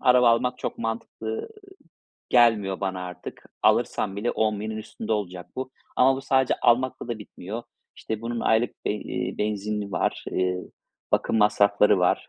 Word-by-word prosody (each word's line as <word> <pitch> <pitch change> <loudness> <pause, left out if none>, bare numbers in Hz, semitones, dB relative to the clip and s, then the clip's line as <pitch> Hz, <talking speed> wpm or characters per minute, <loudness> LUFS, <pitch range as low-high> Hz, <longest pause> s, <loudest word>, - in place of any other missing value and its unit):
araba 125 -1 +6
almak 125 +2 +1
çok - - -4
mantıklı, 115 -1 -4
ııı, 110 - -4 0.8
gelmiyor 110 -6 +4
bana 95 -2 -2
artık. 90 0 -9 0.2
Alırsan 95 - +2
bile 110 +4 0
10.000'in 110 0 -1
üstünde 110 0 -5
olacak 90 -5 -3
bu. 130 0 -4 0.3
Ama 130 +1 +5
bu 135 - -4
sadece 130 -1 +2
almakla 125 +1 +2
da 120 -2 -3
bitmiyor. 105 +2 -7 0.3
İşte, 110 -1 -4
bunun 115 0 -3
aylık 110 +2 +1
be - - +1
eee, 105 - -4
benzini 105 -1 -2
var, - - -1
eee, 90 0 +1 0.5
bakım - - +2
masrafları 105 -1 +4
var, 90 - +1
110 Hz, 150 wpm, -25 LUFS, 100-120 Hz, 0.8 s, araba